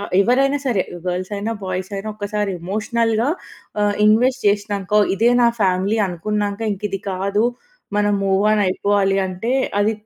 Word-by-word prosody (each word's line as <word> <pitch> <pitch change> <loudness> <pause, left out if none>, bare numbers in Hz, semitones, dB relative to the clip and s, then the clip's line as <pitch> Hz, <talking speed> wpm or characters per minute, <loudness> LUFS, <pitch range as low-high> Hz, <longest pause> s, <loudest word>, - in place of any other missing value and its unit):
ఆహ్ 205 - -7
ఎవరైనా 270 +6 +3
సరే 220 -8 +2 0.2
గర్ల్స్ 180 +2 -3
అయినా, 215 +3 -2
బాయ్స్ 185 +1 -4
అయినా 200 +2 -4
ఒక్కసారి 205 -1 -2
ఎమోషనల్‌గా 225 +5 0 0.6
ఆహ్, 205 0 +2
ఇన్వెస్ట్ 250 +4 +3
చేసినాక, 205 -1 -2 0.2
ఇదే 230 +4 +3
నా 235 - +6
ఫ్యామిలీ 190 +2 +1
అనుకున్నాక, 205 +3 -2
ఇంక 195 - -8
ఇది 195 - -3
కాదు, 195 +3 0 0.5
మనం 205 0 +2
మూవ్ 195 +1 +2
ఆన్ 210 -1 +2
అయిపోవాలి 195 +1 +1
అంటే, 185 +7 -3 0.3
అది 215 +2 +2
205 Hz, 150 wpm, -20 LUFS, 195-220 Hz, 0.6 s, నా